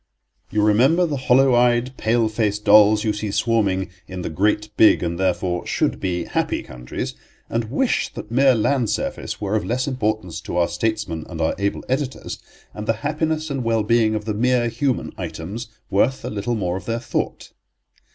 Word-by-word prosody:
You 105 Hz, +1 st, +1 dB
remember 130 Hz, +12 st, +4 dB
the 155 Hz, -4 st, -2 dB
hollow 130 Hz, 0 st, +4 dB
eyed, 120 Hz, +1 st, +3 dB
pale 115 Hz, 0 st, +1 dB
faced 105 Hz, -1 st, -1 dB
dolls 105 Hz, 0 st, +6 dB
you 110 Hz, -, +1 dB
see 105 Hz, 0 st, -4 dB
swarming 100 Hz, -4 st, +1 dB, 0.2 s
in 90 Hz, -1 st, -6 dB
the -, -, -4 dB
great, 105 Hz, +5 st, 0 dB
big 110 Hz, -, +5 dB
and 85 Hz, 0 st, -2 dB
therefore 90 Hz, -1 st, 0 dB
should -, -, 0 dB
be 90 Hz, -2 st, -1 dB
happy -, -, -1 dB
countries, 60 Hz, 0 st, -6 dB, 0.4 s
and 115 Hz, 0 st, 0 dB
wish 240 Hz, -, 0 dB
that 105 Hz, -, -8 dB
mere 130 Hz, +1 st, +5 dB
land 120 Hz, +1 st, +1 dB
surface -, -, -3 dB
were 105 Hz, 0 st, -1 dB
of 110 Hz, -, 0 dB
less 125 Hz, +3 st, -1 dB
importance 110 Hz, -, -2 dB
to 90 Hz, -1 st, -4 dB
our 85 Hz, -1 st, +2 dB
statesmen 90 Hz, -3 st, -2 dB
and -, -, -7 dB
our -, -, +1 dB
able 100 Hz, 0 st, -1 dB
editors, 135 Hz, 0 st, -3 dB, 0.3 s
and 105 Hz, 0 st, -7 dB
the 115 Hz, -, +3 dB
happiness 155 Hz, +1 st, -1 dB
and 135 Hz, -2 st, -2 dB
well 115 Hz, -1 st, +1 dB
being 110 Hz, 0 st, +2 dB
of 105 Hz, -1 st, -3 dB
the 110 Hz, -, -1 dB
mere 120 Hz, +2 st, +2 dB
human 125 Hz, +3 st, -1 dB
items 105 Hz, +9 st, -5 dB, 0.2 s
worth 125 Hz, +7 st, +1 dB
a -, -, -3 dB
little 105 Hz, +3 st, -2 dB
more 90 Hz, -4 st, -1 dB
of 95 Hz, -, -9 dB
their 115 Hz, -, -1 dB
thought. -, -, -3 dB
110 Hz, 185 wpm, -22 LUFS, 100-125 Hz, 0.4 s, dolls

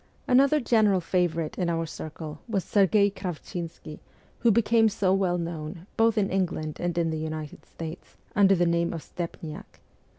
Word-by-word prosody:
Another 275 Hz, +4 st, +5 dB
general 220 Hz, -6 st, +3 dB
favourite 170 Hz, -2 st, -1 dB
in 175 Hz, -2 st, +1 dB
our 165 Hz, -1 st, 0 dB
circle 155 Hz, -1 st, -7 dB
was 200 Hz, -5 st, -1 dB
Serghei 200 Hz, 0 st, +3 dB
Kravchinsky, 170 Hz, -4 st, -6 dB, 0.4 s
who 235 Hz, -, +4 dB
became 225 Hz, 0 st, +4 dB
so 195 Hz, -3 st, +1 dB
well 185 Hz, -2 st, +1 dB
known, 165 Hz, 0 st, -5 dB
both 225 Hz, 0 st, +3 dB
in 200 Hz, -2 st, +1 dB
England 170 Hz, -5 st, -2 dB
and 175 Hz, -1 st, -2 dB
in 165 Hz, -1 st, +1 dB
the 160 Hz, -, -2 dB
United 155 Hz, -1 st, -6 dB
states, 165 Hz, +1 st, -9 dB, 0.2 s
under 195 Hz, -1 st, +6 dB
the 175 Hz, -1 st, +2 dB
name 170 Hz, 0 st, +1 dB
of 165 Hz, -, -6 dB
Stepniak. 170 Hz, +2 st, -7 dB
175 Hz, 160 wpm, -27 LUFS, 165-200 Hz, 0.4 s, under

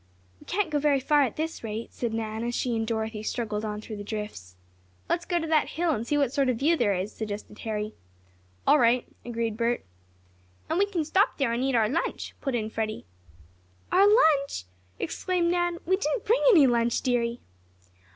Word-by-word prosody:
"We -, -, -18 dB
can't 385 Hz, -4 st, 0 dB
go 295 Hz, -, +1 dB
very 285 Hz, -1 st, +3 dB
far 295 Hz, +2 st, +3 dB
at 260 Hz, -5 st, 0 dB
this 320 Hz, -2 st, -4 dB
rate," 225 Hz, +1 st, -5 dB
said 235 Hz, -2 st, -2 dB
Nan, 220 Hz, 0 st, -3 dB
as 240 Hz, 0 st, -2 dB
she 245 Hz, -2 st, 0 dB
and 225 Hz, 0 st, -1 dB
Dorothy 220 Hz, -1 st, -2 dB
struggled 215 Hz, -1 st, -3 dB
on 210 Hz, -1 st, -4 dB
through 215 Hz, -1 st, -7 dB
the 205 Hz, -, -6 dB
drifts. 205 Hz, -, -6 dB, 0.5 s
"Let's 340 Hz, -, 0 dB
go 350 Hz, -, 0 dB
to 325 Hz, -, -3 dB
that 315 Hz, -1 st, +2 dB
hill, 340 Hz, 0 st, +2 dB
and 235 Hz, -5 st, -2 dB
see 295 Hz, -, +1 dB
what 275 Hz, -3 st, +1 dB
sort 275 Hz, -2 st, +2 dB
of 245 Hz, -, +1 dB
view 310 Hz, +7 st, +3 dB
there 205 Hz, -10 st, +2 dB
is," 190 Hz, +4 st, -3 dB
suggested 210 Hz, -1 st, -6 dB
Harry. 215 Hz, -1 st, -3 dB, 0.7 s
"All 300 Hz, -, +6 dB
right," 240 Hz, 0 st, +3 dB, 0.2 s
agreed 230 Hz, -2 st, -3 dB
Bert. 235 Hz, +1 st, 0 dB, 0.9 s
"And 330 Hz, -, +1 dB
we 405 Hz, -, +3 dB
can 350 Hz, -6 st, -2 dB
stop 390 Hz, +8 st, +2 dB
there 265 Hz, -5 st, +1 dB
and 240 Hz, +2 st, -1 dB
eat 270 Hz, -1 st, +1 dB
our 220 Hz, -2 st, +4 dB
lunch," 315 Hz, +10 st, -2 dB
put 270 Hz, -3 st, -1 dB
in 220 Hz, -2 st, -2 dB
Freddie. 220 Hz, -, -3 dB, 0.9 s
"Our 390 Hz, +2 st, +6 dB
lunch!" 310 Hz, -, +4 dB, 0.3 s
exclaimed 355 Hz, -2 st, 0 dB
Nan. 350 Hz, -1 st, 0 dB
"We 375 Hz, +2 st, +2 dB
didn't 390 Hz, +4 st, -2 dB
bring 465 Hz, +4 st, +3 dB
any 335 Hz, -, +7 dB
lunch, 235 Hz, -2 st, +2 dB
dearie!" 240 Hz, -2 st, 0 dB
245 Hz, 200 wpm, -27 LUFS, 220-320 Hz, 0.9 s, any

